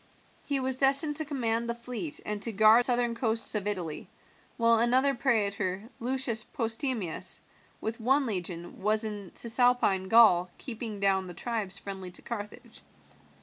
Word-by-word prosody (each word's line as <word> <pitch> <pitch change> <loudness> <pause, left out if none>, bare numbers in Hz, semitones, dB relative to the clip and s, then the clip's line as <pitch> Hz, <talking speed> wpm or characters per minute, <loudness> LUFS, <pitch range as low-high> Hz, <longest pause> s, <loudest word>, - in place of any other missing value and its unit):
He 280 -1 0
was 260 0 -2
destined 280 +2 +4
to 315 - 0
command 235 -5 -1
the 235 - -2
fleet 235 -10 -3
and 210 -1 -2
to 230 - -3
guard 220 +2 +6
the 245 - +1
southern 240 -1 +1
coasts 230 -1 +1
of 210 -2 -1
Italy, 175 -7 -3 0.5
while 230 -1 +3
another 255 +4 +3
praetor, 210 -5 -1
Lucius 245 -2 -1
Postumius, 230 - -2 0.4
with 225 +1 -4
one 270 +4 +2
legion, 180 -5 -3
was 215 +2 +2
in 205 -3 -5
Cisalpine 235 -5 +2
Gaul 190 -6 +5
keeping 225 -4 -5
down 190 -1 +2
the 175 - -9
tribes 215 -5 -3
friendly 190 -2 -7
to - - -3
Carthage. 210 -3 -8
225 Hz, 150 wpm, -28 LUFS, 200-245 Hz, 0.5 s, guard